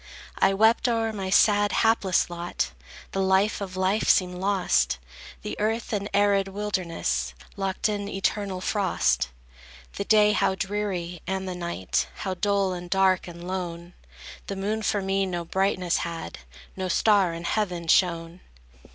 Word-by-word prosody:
I 195 - +4
wept 220 +4 +4
o'er 225 -1 0
my 195 -2 -4
sad, 205 +1 +4
hapless 220 -5 +2
lot; 175 - -3 0.4
The 195 - -2
life 190 +3 +2
of 185 -2 -5
life 190 +3 +1
seemed 180 -1 +4
lost; 185 - +1 0.5
The - - -4
earth 225 +2 -1
an 205 0 -2
arid 200 -1 +3
wilderness, 195 -4 -2 0.2
Locked 195 0 -1
in 205 -1 -2
eternal 195 -1 -2
frost; 65 - +1 0.7
The - - -1
day 210 0 +5
how 200 -2 +2
dreary, 190 -4 -3
and 190 0 -2
the 185 - -3
night 130 - -2
How 190 - -3
dull, 195 0 +1
and 175 0 -7
dark, 190 -1 +2
and 170 0 -9
lone! 175 -2 -5 0.5
The 195 - -3
moon 210 +3 -2
for 205 -1 0
me 195 0 0
no 175 -2 -3
brightness 185 -1 0
had, 165 - -5 0.4
No 190 -1 -3
star 195 -1 +3
in 170 - -7
heaven 180 -3 -1
shone. 170 0 +2
190 Hz, 150 wpm, -26 LUFS, 175-205 Hz, 0.7 s, day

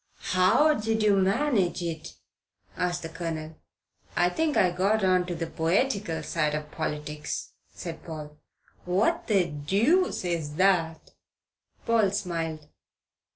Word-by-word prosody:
"How 185 +12 +5
did 220 -4 -1
you 210 -1 +5
manage 195 -2 +1
it?" 165 -1 -5 0.6
asked 175 -1 -1
the 165 - -5
Colonel. 160 -1 -5 0.6
"I 175 - +3
think 315 - 0
I 180 - +4
got 195 +4 +1
on 185 -1 +3
to 175 - -3
the 165 0 -3
poetical 170 0 0
side 150 -1 0
of 150 0 -5
politics," 150 -1 -4 0.2
said 165 -2 -7
Paul. 150 -2 -8 0.5
"What 205 - +1
the 195 -5 +3
deuce 195 - +1
is 160 -4 -2
that?" 165 -3 +1 0.7
Paul 225 -3 +3
smiled. 165 -6 -3
175 Hz, 125 wpm, -27 LUFS, 160-205 Hz, 0.7 s, How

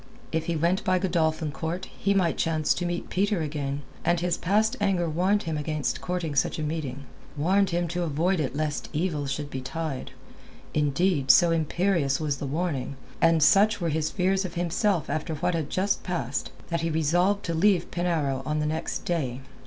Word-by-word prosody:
If 160 0 -1
he 170 - 0
went 170 +4 +1
by 185 -2 +2
Godolphin 160 -4 0
Court 160 +6 -4
he 200 0 +1
might 180 -4 +2
chance 155 -2 +1
to 175 - -2
meet 175 0 -4
Peter 200 -1 +1
again, 145 -2 -3 0.2
and 175 0 +2
his 175 0 0
past 215 +5 +1
anger 190 -4 +2
warned 185 +6 +1
him 160 -2 -2
against 150 -1 -2
courting 175 -4 -2
such 135 - +1
a 155 - -2
meeting, 150 -4 -3 0.3
warned 190 +6 +3
him 175 0 0
to 175 +2 -2
avoid 170 +3 +1
it 135 -3 -2
lest 150 -1 -2
evil 155 -3 -1
should 145 +2 -4
betide. 135 +2 -4 0.6
Indeed, 150 0 +1
so 170 +4 +7
imperious 165 -3 +1
was 150 -3 -1
the 140 - -4
warning, 145 -3 -2 0.3
and 165 -2 +5
such 205 +6 +5
were 170 -2 0
his 155 0 0
fears 190 +1 +1
of 180 -3 -6
himself 175 0 0
after 155 +2 -2
what 175 +4 0
had 160 -3 -2
just 200 +2 0
passed, 140 -8 -3 0.2
that 170 -1 -1
he 165 - 0
resolved 175 +6 +2
to 170 - -1
leave 180 +1 +2
Penarrow 160 -7 0
on 150 +3 -1
the 150 - 0
next 160 +1 -3
day. 135 -7 -1
165 Hz, 185 wpm, -26 LUFS, 150-180 Hz, 0.6 s, so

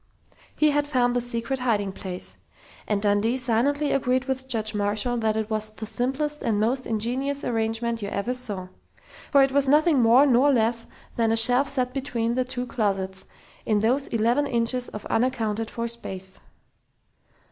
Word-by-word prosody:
He 305 -1 +3
had 290 0 0
found 245 -4 +1
the 245 - +1
secret 245 +2 -3
hiding 210 -6 0
place. 185 -1 -6 0.5
And 205 -1 -1
Dundee 210 +4 +2
silently 265 +4 +1
agreed 255 -1 +1
with 260 0 -3
Judge 220 -4 0
Marshall 210 +4 -1
that 220 -1 0
it 220 0 -3
was 215 0 -1
"the 215 +1 -8
simplest 270 +7 -2
and 215 -2 0
most 250 +5 0
ingenious 255 +6 -2
arrangement 225 0 -1
you 200 - -4
ever 200 +6 -2
saw," 205 -8 -6 0.6
for 280 -2 +5
it 270 - +1
was 280 0 +2
nothing 300 0 +4
more 240 +5 +6
nor 270 +1 +4
less 230 -2 +1 0.3
than 225 -1 +2
a 225 - +3
shelf 250 +4 +6
set 255 -2 -1
between 235 -4 -2
the 255 +1 +1
two 250 0 -4
closets, 195 -5 -2 0.4
in 210 -2 +1
those 255 +5 +1
eleven 235 +6 +1
inches 245 +1 0
of 210 - -8
unaccounted 225 -3 -1
for 235 0 -4
space! 190 -5 -6
235 Hz, 170 wpm, -25 LUFS, 220-260 Hz, 0.6 s, more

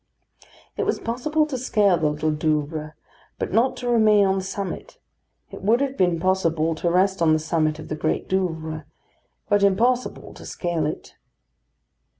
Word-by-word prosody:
It - - 0
was - - 0
possible 300 +7 0
to 275 -4 -4
scale 210 -6 +3
the 155 -3 +1
Little 155 +1 -1
Douvre, 155 0 -2 0.4
but - - -4
not 255 +4 +2
to 250 - -5
remain 215 -4 +5
on 190 0 +1
the - - -5
summit; 195 0 -5 0.5
it - - -9
would 220 +5 +3
have 275 -1 -1
been 180 -5 +2
possible 165 -3 +1
to 165 +2 -1
rest 190 +2 +2
on 160 -2 +4
the - - +4
summit 155 -1 0
of 155 - -9
the 155 - -3
Great 155 +1 -2
Douvre, 160 -5 -2 0.6
but 205 -1 +3
impossible 235 +6 +1
to - - -12
scale 170 -4 -2
it. - - -7
185 Hz, 165 wpm, -23 LUFS, 155-215 Hz, 0.6 s, remain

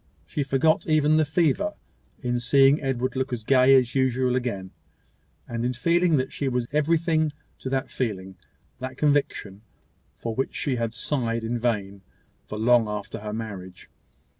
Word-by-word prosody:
She 80 - -3
forgot 140 +4 +2
even 155 -1 +3
the 155 - +3
fever, 175 +6 +1 0.5
in 120 0 0
seeing 135 +3 +4
Edward 130 -2 -1
look 130 0 -1
as 120 -3 -3
gay 130 +2 +5
as 125 -2 +3
usual 130 -1 +1
again, 100 -7 -3 0.8
and 115 -1 -3
in 125 +1 0
feeling 170 +4 +2
that 130 0 -2
she 140 - -2
was 125 -2 -1
everything 155 +1 +1 0.3
to 130 - -5
that 135 0 -2
feeling, 95 -6 -3 0.4
that 130 0 -6
conviction, 140 -9 0 0.5
for 115 - -4
which 135 +4 -2
she 135 -4 -1
had 115 -1 -2
sighed 115 -5 -1
in 120 +1 -2
vain, 100 -5 -2 0.5
for 105 - -6
long 115 0 +4
after 105 -1 -5
her 105 0 -6
marriage. 100 -5 -7
130 Hz, 160 wpm, -25 LUFS, 115-145 Hz, 0.8 s, gay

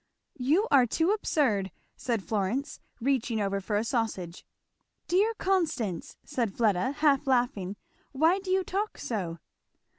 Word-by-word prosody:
"You 310 - +2
are 260 -3 +6
too 325 - +1
absurd!" 255 - +1 0.3
said 230 -5 -2
Florence, 220 +9 -2 0.2
reaching 245 -3 0
over 200 -1 -1
for 205 +2 -2
a 210 - +1
sausage. 220 -8 -2 0.6
"Dear 410 +6 +2
Constance!" 315 - -1
said 235 -9 -2
Fleda, 215 +1 +2
half 290 -2 +2
laughing, 240 -7 +1 0.4
"why 320 +7 +3
do 385 -1 -8
you 375 0 +2
talk 405 +4 -2
so?" 180 -8 -3
250 Hz, 130 wpm, -28 LUFS, 205-320 Hz, 0.6 s, are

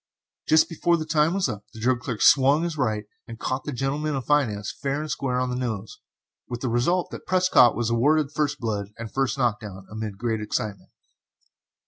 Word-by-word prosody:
Just 155 0 +5
before 170 +1 +1
time 155 +2 +2
was 195 -5 +1
up, 105 -4 -6
the - - -9
drug 125 +2 +1
clerk 120 -2 -3
swung 140 +3 +5
his 170 -2 -2
right 110 -7 -1 0.2
and 115 -2 -8
caught 130 +1 -3
the 150 - -3
gentleman 145 +3 -2
of 135 - -4
finance 110 -9 +1
fair 140 +1 -3
and 155 -1 -5
square 130 -3 -1
on 125 0 -1
the - - -2
nose, 110 -5 -4 0.5
with 120 0 -5
the 130 - -1
result 150 +10 +1
that - - -9
Prescott 185 -10 +5
was 120 -1 -1
awarded 145 +5 +2
first 150 -1 -1
blood 105 -3 -3
and 115 -2 -7
first 135 0 0
knock 120 -5 +1
down, 95 -3 -9
amid 110 -2 -5
great 110 0 -1
excitement. 105 -2 -4
125 Hz, 195 wpm, -25 LUFS, 110-150 Hz, 0.5 s, Just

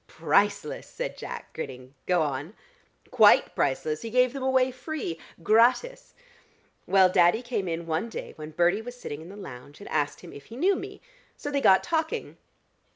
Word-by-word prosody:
"Priceless!" - - 0
said - - -5
Jack 475 -1 -8
grinning. 130 -4 -7
"Go 180 -3 +3
on." 145 +7 -4 0.6
"Quite 220 -4 +6
priceless: 150 +3 -1
he 230 - -5
gave 250 +1 +3
them 275 - -5
away 260 0 +2
free, 255 - -5 0.2
gratis. 255 - +2 0.7
Well, 190 -1 +6
Daddy 180 +5 +3
came 235 -6 -2
in 170 0 -3
one 165 +7 -2
day - - -7
when 155 0 -8
Bertie 175 +6 +2
was 245 +2 -9
sitting 145 -7 -6
in 165 - -11
the 200 - -10
lounge, 145 -7 -10
and 200 - -10
asked 145 -1 -1
him - - -11
if 140 - -11
he 230 - -11
knew 380 +7 +3
me. - - -8 0.4
So 290 - -5
they 280 -1 0
got 190 -6 +5
talking. 335 +7 -2
205 Hz, 175 wpm, -27 LUFS, 160-255 Hz, 0.7 s, Quite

